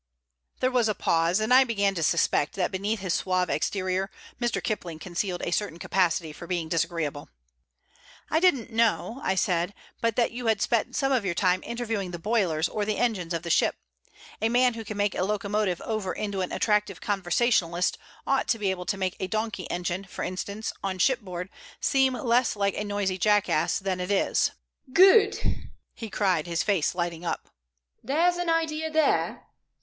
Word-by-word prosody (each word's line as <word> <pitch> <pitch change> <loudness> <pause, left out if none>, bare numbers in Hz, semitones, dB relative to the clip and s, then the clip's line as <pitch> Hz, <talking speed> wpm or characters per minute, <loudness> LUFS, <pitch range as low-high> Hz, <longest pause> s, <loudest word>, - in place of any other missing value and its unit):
There 255 - +2
was 240 -3 +2
a 210 - 0
pause, 165 +3 +2
and 220 +3 +2
I 260 +1 +8
began 200 -5 +1
to 170 - -3
suspect 150 -1 +2
that 185 0 0
beneath 200 +2 -2
his 185 -3 -1
suave 185 -1 0
exterior 185 +3 -1 0.3
Mr. 240 -4 0
Kipling 175 -3 -3
concealed 175 +2 -3
a - - -2
certain 190 -3 -1
capacity 170 -3 0
for 170 - -10
being 175 -3 -2
disagreeable. 165 -3 -2 1.0
"I 315 - +2
didn't 280 -10 +2
know," 230 +2 +1
I 190 - +1
said, 180 0 0 0.3
"but 230 -2 +1
that 240 - +2
you 240 0 -5
had 220 -2 +3
spent 230 +2 0
some 270 -1 +1
of 255 -5 +2
your 180 -3 -1
time 185 0 +2
interviewing 225 -5 -3
the 175 - -5
boilers 175 -5 +1
or 210 - -2
the 210 0 -1
engines 200 -8 0
of 165 -1 -2
the 170 - -2
ship. - - +3 0.7
A 220 - +2
man 245 +1 +3
who 225 -1 -6
can 215 -1 -6
make 205 -1 +1
a - - -1
locomotive 205 -2 0
over 215 -5 -2
into 205 -2 -3
an 185 - -3
attractive 210 -3 +1
conversationalist 185 -2 +1 0.3
ought 270 0 +1
to 230 - +2
be 200 -3 0
able 180 -1 -5
to 200 - 0
make 190 -1 -1
a 190 - -2
donkey 215 -1 -3
engine, 180 +2 -2
for 195 - -6
instance, 200 +4 -4
on 190 -1 -2
shipboard, 185 -6 0 0.3
seem 265 -2 +2
less 245 -3 +2
like 200 -1 +1
a - - -2
noisy 205 -2 -1
jackass 205 -5 +2
than 190 -1 -2
it 180 +1 -3
is." 200 -1 +2 0.4
"Good!" 390 - +4 0.3
he 225 - -7
cried, 185 -6 +1
his 170 -1 0
face 190 -6 +1
lighting 175 -1 -3
up. 170 - -3 0.5
"There's 335 +8 +2
an 350 -1 -1
idea 320 -1 0
there. 315 -2 +1
200 Hz, 185 wpm, -27 LUFS, 180-230 Hz, 1.0 s, I